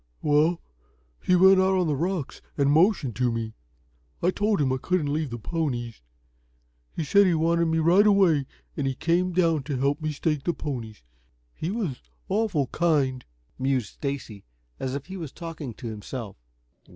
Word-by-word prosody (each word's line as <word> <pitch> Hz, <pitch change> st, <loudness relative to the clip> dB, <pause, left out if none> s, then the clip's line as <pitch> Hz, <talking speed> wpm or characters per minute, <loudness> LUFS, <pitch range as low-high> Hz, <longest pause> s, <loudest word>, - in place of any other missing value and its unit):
"Well, 155 Hz, +3 st, +3 dB, 0.6 s
he 180 Hz, -, +3 dB
went 190 Hz, +1 st, +7 dB
out 190 Hz, 0 st, +3 dB
on 180 Hz, -, +2 dB
the 150 Hz, -3 st, 0 dB
rocks 170 Hz, 0 st, -3 dB, 0.2 s
and 140 Hz, -1 st, +3 dB
motioned 160 Hz, -, +3 dB
to 125 Hz, -1 st, +2 dB
me. 115 Hz, -1 st, -3 dB, 0.7 s
I 180 Hz, -, +4 dB
told 205 Hz, +2 st, 0 dB
him 135 Hz, -3 st, +2 dB
I -, -, 0 dB
couldn't 150 Hz, 0 st, 0 dB
leave 155 Hz, -2 st, -1 dB
the 120 Hz, -, -5 dB
ponies. 120 Hz, -, -3 dB, 0.9 s
He 165 Hz, -, -3 dB
said 200 Hz, +7 st, +5 dB
you 170 Hz, -3 st, +2 dB
wanted 170 Hz, +1 st, +2 dB
me 160 Hz, 0 st, +1 dB
right 175 Hz, +6 st, +5 dB
away, 175 Hz, -9 st, +4 dB, 0.3 s
and 140 Hz, -, -1 dB
he 135 Hz, -, -1 dB
came 175 Hz, +5 st, +1 dB
down 165 Hz, -4 st, +2 dB
to 145 Hz, -3 st, -2 dB
help 140 Hz, +4 st, 0 dB
me 155 Hz, 0 st, -1 dB
stake 150 Hz, -1 st, -1 dB
the 175 Hz, -, -1 dB
ponies. 115 Hz, -, -6 dB, 0.5 s
He 160 Hz, -, -4 dB
was 190 Hz, -, -3 dB, 0.3 s
awful 195 Hz, -8 st, +1 dB
kind," 140 Hz, -5 st, 0 dB, 0.4 s
mused 130 Hz, -3 st, 0 dB
Stacy, 135 Hz, -8 st, -5 dB, 0.4 s
as 130 Hz, 0 st, -3 dB
if 165 Hz, +1 st, -6 dB
talking 160 Hz, -8 st, -7 dB
to 120 Hz, -, -8 dB
himself. 110 Hz, 0 st, -7 dB
155 Hz, 165 wpm, -26 LUFS, 130-175 Hz, 0.9 s, went